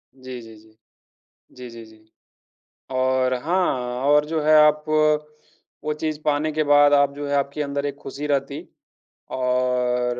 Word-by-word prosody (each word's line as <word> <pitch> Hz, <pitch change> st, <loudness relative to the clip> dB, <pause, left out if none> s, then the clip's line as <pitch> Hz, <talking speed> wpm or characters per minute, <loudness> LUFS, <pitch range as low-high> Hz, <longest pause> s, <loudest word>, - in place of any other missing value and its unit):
जी, 130 Hz, -1 st, -9 dB
जी, 115 Hz, -1 st, -13 dB
जी। 110 Hz, 0 st, -21 dB, 0.8 s
जी, 125 Hz, -1 st, -9 dB
जी, 115 Hz, 0 st, -11 dB
जी। 110 Hz, 0 st, -21 dB, 0.8 s
और 130 Hz, 0 st, +1 dB
हाँ 130 Hz, -8 st, -1 dB
और 150 Hz, +1 st, +4 dB
जो 160 Hz, +1 st, -2 dB
है 155 Hz, +1 st, +4 dB
आप 150 Hz, 0 st, +2 dB, 1.0 s
वो 150 Hz, -, -1 dB
चीज़ 155 Hz, -1 st, -2 dB
पाने 150 Hz, +1 st, 0 dB
के 155 Hz, +1 st, 0 dB
बाद 145 Hz, 0 st, +5 dB
आप 140 Hz, -1 st, +3 dB
जो 145 Hz, 0 st, -6 dB
है 145 Hz, -, -1 dB
आपके 140 Hz, +2 st, -2 dB
अंदर 140 Hz, 0 st, -3 dB
एक 140 Hz, -1 st, -5 dB
खुशी 145 Hz, +2 st, -6 dB
रहती 140 Hz, -1 st, -2 dB, 0.8 s
और 125 Hz, -1 st, 0 dB
140 Hz, 155 wpm, -22 LUFS, 125-145 Hz, 1.0 s, बाद